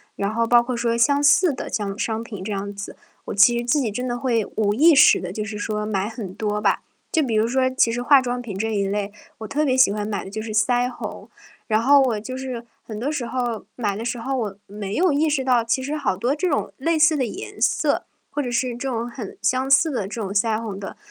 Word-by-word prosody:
然 200 +1 -1
后 230 +1 +1
包 240 +1 +5
括 240 0 -3
说 235 -1 0
相 285 +4 +3
似 290 +5 +5
的 255 - -6
这 210 - -1
样 200 - -3
的 - - -13
商 225 0 -2
品 205 -5 -8
这 215 - -4
样 200 0 -3
子， 200 0 -8 0.3
我 - - -4
其 235 +4 +5
实 240 - -3
自 290 +3 +2
己 230 - -1
真 250 +5 -3
的 240 - -2
会 240 -4 0
无 205 -1 +2
意 320 +5 +6
识 275 - +7
地 180 - -5
就 210 +3 -4
是 215 -1 -6
说 210 0 -3
买 200 -1 -1
很 215 -5 -7
多 210 -1 -2
吧。 - - +1 0.3
就 315 - +2
比 240 - -2
如 220 +1 +2
说 255 +1 +2
其 245 -3 +3
实 245 +1 -2
化 280 +1 +6
妆 245 -1 -2
品 225 -6 -6
这 220 +2 -2
一 200 - +1
类， 200 0 -2 0.3
我 220 - -6
特 300 +5 0
别 260 -2 +2
喜 260 -6 +5
欢 210 0 -3
买 205 -2 -3
的 - - -9
就 215 +2 -5
是 220 0 -5
腮 245 +3 +2
红。 250 - -7 0.4
然 215 -1 +2
后 280 +4 +5
我 240 -5 +1
就 255 +5 -6
是 255 -3 -5 0.2
很 215 -2 -8
多 275 +6 -1
时 250 -6 -3
候 240 -4 -2
买 205 -5 -1
的 220 - -5
时 240 +1 -2
候 265 +4 -3
我 210 -6 -3
没 205 0 -6
有 360 -1 +3
意 305 +2 +2
识 280 -3 0
到， 250 -3 +3
其 240 +3 0
实 290 +3 -3
好 245 -11 -1
多 240 +7 0
这 355 +4 -1
种 285 - -1
类 325 +4 0
似 310 +1 +5
的 265 - 0
颜 370 - -8
色， - - +1 0.3
或 290 - -1
者 245 -3 -3
是 240 0 -1
这 265 +3 -4
种 235 -1 -2
很 235 -4 -8
相 260 +1 +1
似 290 +3 +5
的 210 -7 -2
这 220 +3 -6
种 195 -2 -4
腮 215 +1 +1
红 210 -4 -6
的， 195 - -8
235 Hz, 290 characters per minute, -22 LUFS, 210-260 Hz, 0.4 s, 识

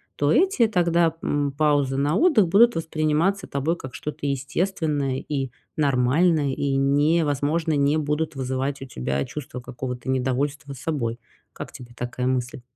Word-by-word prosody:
то 145 +1 +1
эти 350 - +4
тогда, 170 -4 +2
м, 145 -1 0
паузы 145 -2 +1
на 145 +3 +1
отдых 280 - +4
будут 230 +7 +5
восприниматься 160 +4 0
тобой 140 +5 -1
как 130 -4 -9
что-то 150 -1 -5
естественное 145 0 -1
и 135 -2 -3 0.3
нормальное, 145 +2 +2
и 140 0 -1
не 145 +4 +3
возможно, 150 +3 0
не 145 +2 +2
будут 150 0 -1
вызывать 130 +1 -2
у - - -6
тебя 70 - -2
чувство 130 -4 -7
какого-то 125 0 -6
недовольства 135 +2 -1
собой. 125 -4 -3 0.3
Как - - -8
тебе 120 -1 -12
такая 125 +1 -3
мысль? 125 -1 -2
145 Hz, 145 wpm, -24 LUFS, 130-160 Hz, 0.3 s, будут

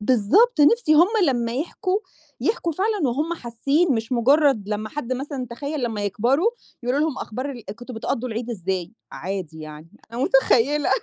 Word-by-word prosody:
بالضبط. 260 - +3
نِفْسي 310 0 +5
هم 340 +4 +6 0.2
لمّا 235 -3 0
يحكوا، 370 +7 -1 0.4
يحكوا 410 -6 0
فعلًا 390 -2 0
وهُم 300 +8 -1
حاسّين، 275 +5 0
مش 225 +3 -3
مُجرّد 260 -3 +3
لمّا 215 0 -2
حد 255 -2 -4
مثلًا 265 -1 -4
تخيّل 280 +3 -4
لمّا 215 -3 -2
يكبروا، 260 - +2 0.3
يقولوا 250 +4 0
لهم 305 -3 0
أخبار 255 +6 -4
ال 240 -5 -9
كنتم 245 0 -9
بتقضّوا 235 +2 -2
العيد 230 +2 -4
إزاي؟ 185 -2 -3 0.2
عادي 180 -4 -5
يعني، 155 +1 -10 0.2
أنا 240 - -2
متخيّلة، 270 +2 +3
255 Hz, 160 wpm, -23 LUFS, 225-300 Hz, 0.4 s, هم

